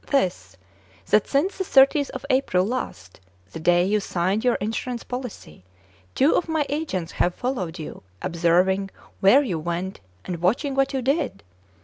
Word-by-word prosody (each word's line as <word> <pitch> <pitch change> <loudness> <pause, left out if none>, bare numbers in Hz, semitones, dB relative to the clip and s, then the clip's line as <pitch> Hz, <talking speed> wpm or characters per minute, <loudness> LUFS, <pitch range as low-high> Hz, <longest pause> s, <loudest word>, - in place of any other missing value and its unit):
This: 135 - -1 0.5
that 210 - +4
since 340 +9 0
the - - +1
30th 280 -2 +4
of 265 - -7
April 225 -9 +2
last, 200 - -5 0.3
the - - -7
day 175 +2 +3
you 210 +2 +2
signed 190 +2 -1
your 245 -1 +3
insurance 225 +3 -3
policy, 245 - -7 0.5
two 280 +4 +4
of 350 - 0
my 315 -2 +1
agents 280 - -3
have 175 - 0
followed 195 -10 -3
you, 155 - -8 0.2
observing 180 +3 +1 0.3
where 240 +9 +6
you 185 - -2
went, 175 +4 -4 0.3
and 170 -2 -5
watching 250 - +1
what 270 0 +1
you 265 -2 -2
did." 275 - -1
210 Hz, 155 wpm, -24 LUFS, 175-270 Hz, 0.5 s, where